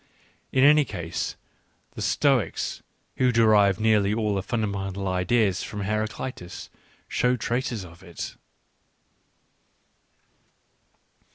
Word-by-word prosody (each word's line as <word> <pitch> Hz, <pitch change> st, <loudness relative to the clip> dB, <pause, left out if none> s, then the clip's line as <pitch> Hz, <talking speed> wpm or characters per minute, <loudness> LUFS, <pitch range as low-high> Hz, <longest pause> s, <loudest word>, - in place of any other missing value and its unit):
In 130 Hz, -, +3 dB
any 150 Hz, +1 st, +7 dB
case, 85 Hz, -, -4 dB, 0.6 s
the -, -, -8 dB
Stoics, -, -, +1 dB, 0.4 s
who 125 Hz, -1 st, +3 dB
derived 105 Hz, -4 st, +4 dB
nearly 105 Hz, -2 st, +3 dB
all 105 Hz, -2 st, 0 dB
their 95 Hz, -, 0 dB
fundamental 100 Hz, -3 st, -2 dB
ideas 95 Hz, +1 st, +1 dB
from 105 Hz, -, -5 dB
Heraclitus, 110 Hz, -2 st, -4 dB, 0.4 s
show 125 Hz, 0 st, +2 dB
traces 120 Hz, -3 st, -2 dB
of 85 Hz, 0 st, -14 dB
it. 85 Hz, -3 st, -7 dB
105 Hz, 95 wpm, -25 LUFS, 95-115 Hz, 0.6 s, any